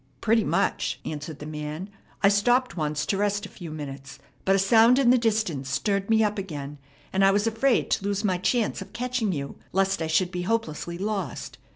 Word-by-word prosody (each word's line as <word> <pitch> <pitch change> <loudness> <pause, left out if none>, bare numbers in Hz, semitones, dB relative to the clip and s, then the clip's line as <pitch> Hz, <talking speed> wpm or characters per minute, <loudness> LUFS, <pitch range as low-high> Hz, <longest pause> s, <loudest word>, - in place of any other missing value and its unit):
"Pretty 225 0 +3
much," - - 0
answered 150 0 -5
the 150 - -9
man. 155 +3 -5 0.4
"I - - +7
stopped 245 +6 +3
once 150 -2 -1
to 195 - 0
rest 205 0 0
a - - -9
few 175 -4 -9
minutes; 140 -3 -7 0.3
but 195 - +4
a - - +4
sound 225 +5 +5
in 260 -3 +5
the - - +6
distance 210 - 0
stirred 200 +9 0
me 220 0 +4
up 210 -1 0
again, 150 -6 -6 0.3
and 190 +1 +3
I 195 - +7
was 205 +2 +2
afraid 230 +3 +1
to 195 - +1
lose 200 0 -1
my 185 -4 +1
chance 230 +3 0
of 195 - -10
catching 250 -4 -1
you, 140 -4 -4 0.2
lest 195 -1 +1
I 160 - -1
should 175 +3 +2
be 180 -1 -3
hopelessly 175 -5 -2
lost. 200 +1 -4
195 Hz, 205 wpm, -26 LUFS, 155-220 Hz, 0.4 s, I